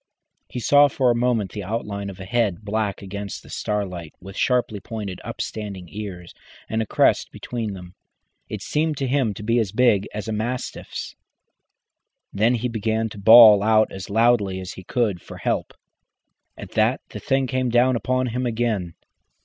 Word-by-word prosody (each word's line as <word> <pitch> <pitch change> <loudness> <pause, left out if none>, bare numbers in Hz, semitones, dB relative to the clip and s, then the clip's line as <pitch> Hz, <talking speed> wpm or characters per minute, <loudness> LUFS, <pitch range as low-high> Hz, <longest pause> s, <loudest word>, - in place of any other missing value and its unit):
He - - -5
saw 145 +5 +6
for 130 -3 +2
a - - +1
moment 120 -4 0
the 105 - -5
outline 100 -1 -4
of 95 0 -10
a 95 - -7
head 105 -2 0
black 105 -1 -2
against 100 0 -6
the - - -14
starlight, 90 -6 -3
with 95 +1 -11
sharply 125 -4 +1
pointed 100 -3 -6
upstanding 100 -4 -5
ears 95 -4 -7 0.3
and 110 0 -1
a 110 - -3
crest - - +2
between 115 -4 -5
them. 90 -1 -10 0.6
It - - -5
seemed 155 0 0
to 135 - -1
him 130 -5 +1
to 105 - -8
be 115 +3 +2
as 105 -5 -1
big 110 -3 +3
as 105 -1 -5
a - - -2
mastiff's. 120 +4 -4 1.2
Then 110 +5 +3
he 120 +1 -1
began 110 -1 -1
to 105 - -10
bawl 110 -1 +9
out 110 +1 +3
as 95 -2 -7
loudly 105 -3 +2
as 95 -1 -6
he 95 - -10
could 105 -4 -1
for - - -11
help. - - -1 0.9
At - - -9
that - - +2
the - - -7
thing 135 0 +1
came 130 -1 -1
down 120 +2 +3
upon 130 +4 0
him 125 +2 -2
again. 110 -7 -1
110 Hz, 175 wpm, -23 LUFS, 100-120 Hz, 1.2 s, bawl